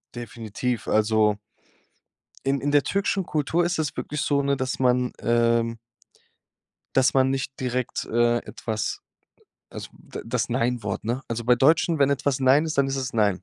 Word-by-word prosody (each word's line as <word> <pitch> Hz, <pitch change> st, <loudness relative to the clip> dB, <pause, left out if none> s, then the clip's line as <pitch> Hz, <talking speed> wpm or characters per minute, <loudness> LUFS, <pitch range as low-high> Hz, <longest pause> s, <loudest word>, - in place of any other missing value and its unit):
Definitiv, 120 Hz, 0 st, -4 dB
also 110 Hz, -1 st, +2 dB, 1.1 s
in 135 Hz, 0 st, +1 dB
in 145 Hz, +1 st, 0 dB
der 145 Hz, -1 st, +4 dB
türkischen 195 Hz, -1 st, 0 dB
Kultur 160 Hz, +3 st, 0 dB
ist 175 Hz, -1 st, -1 dB
es 150 Hz, -1 st, -2 dB
wirklich 150 Hz, -1 st, -3 dB
so, 140 Hz, -1 st, +1 dB
ne, 140 Hz, 0 st, +1 dB
dass 130 Hz, 0 st, -3 dB
man, 125 Hz, -1 st, +2 dB
ähm 115 Hz, -1 st, +1 dB, 1.2 s
dass 130 Hz, -1 st, +4 dB
man 130 Hz, 0 st, +3 dB
nicht 135 Hz, 0 st, -3 dB
direkt, 125 Hz, -1 st, -2 dB
äh, 120 Hz, +1 st, +2 dB
etwas, 110 Hz, -2 st, -4 dB, 0.7 s
also -, -, -8 dB
da -, -, -9 dB
das 120 Hz, 0 st, -1 dB
Nein 120 Hz, -1 st, 0 dB
Wort, 100 Hz, -2 st, -4 dB
ne? 120 Hz, +4 st, -2 dB
Also, 115 Hz, 0 st, -3 dB
bei 125 Hz, 0 st, +4 dB
Deutschen, 160 Hz, +4 st, +3 dB
wenn 140 Hz, 0 st, +4 dB
etwas 140 Hz, -1 st, 0 dB
„Nein“ 135 Hz, +4 st, +4 dB
ist, 155 Hz, -3 st, -3 dB
dann 135 Hz, -, +4 dB
ist 135 Hz, -, -2 dB
es 130 Hz, -2 st, -3 dB
„Nein.” 100 Hz, -5 st, +1 dB
125 Hz, 170 wpm, -24 LUFS, 115-140 Hz, 1.2 s, der